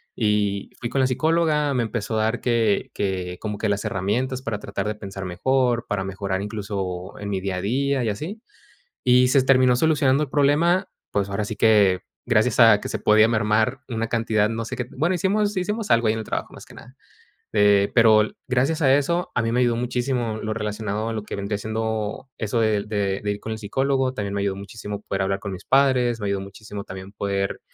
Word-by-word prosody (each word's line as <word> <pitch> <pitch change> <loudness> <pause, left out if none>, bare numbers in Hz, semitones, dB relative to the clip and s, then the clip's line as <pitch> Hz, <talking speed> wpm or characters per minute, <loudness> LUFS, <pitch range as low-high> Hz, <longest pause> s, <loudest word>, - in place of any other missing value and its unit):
Y 105 -3 0
fui 120 - -3
con 135 - -1
la 130 - +4
psicóloga, 155 +1 +1
me 125 - +1
empezó 110 0 -2
a 110 - +2
dar 110 +2 -1
que 115 -4 +1
que 90 -3 -3
como 105 -2 -4
que 110 - -1
las 105 0 -1
herramientas 120 +8 -1
para 115 -6 -3
tratar 100 +1 -4
de 105 - -2
pensar 95 -2 -7
mejor, 120 +6 0
para 100 -2 -1
mejorar 95 0 -3
incluso 100 -3 -5
en 100 0 -5
mi 95 - -1
día 95 0 -3
a - - -3
día 135 +5 0
y 110 - 0
así. 165 - -5 0.6
Y 125 0 +5
se 130 +1 +4
terminó 130 -2 +4
solucionando 145 0 +3
el 140 - -5
problema, 165 +6 +3 0.2
pues 100 -1 0
ahora 100 +1 -2
sí 110 - -5
que, 105 -4 +4 0.3
gracias - - +2
a - - +7
que - - -5
se - - -2
podía 110 +1 +5
mermar 110 +3 +1
una 115 -1 -2
cantidad, 110 -2 +1
no 115 0 -3
sé - - -5
qué 125 - -2
bueno, 160 +6 +2
hicimos 205 +3 +1
hicimos 210 +4 -2
algo 115 -1 +4
ahí 110 - +3
en 110 - -3
el 110 - -6
trabajo, - - -4
más - - -11
que - - -16
nada, 125 +3 -14 0.6
eh, 105 -1 +4
pero 110 -3 +6
l 105 - -2
gracias 135 +6 +1
a 135 -2 +5
eso, 170 +5 0
a - - +2
mí 115 - 0
me 125 - +1
ayudó 120 -2 +2
muchísimo 120 -1 -1
lo 110 0 -2
relacionado 105 0 -3
a - - -3
lo 110 - -3
que - - -6
vendría 100 +1 -3
siendo 110 +3 -3
eso 115 +2 0
del 105 -1 +1
de 100 -2 -1
de 105 - 0
ir 105 - -4
con 110 - -6
el 110 - -4
psicólogo. 130 +4 0
También 100 -2 -3
me 100 - -1
ayudó 100 -1 -1
muchísimo 100 +1 -7
poder 95 0 -2
hablar 95 0 0
con 100 - -6
mis 90 - -8
padres. 130 -3 +3
Me - - -2
ayudó 100 0 0
muchísimo 100 +1 -8
también 95 +1 -9
poder, 100 -1 -2
110 Hz, 220 wpm, -23 LUFS, 100-130 Hz, 0.6 s, a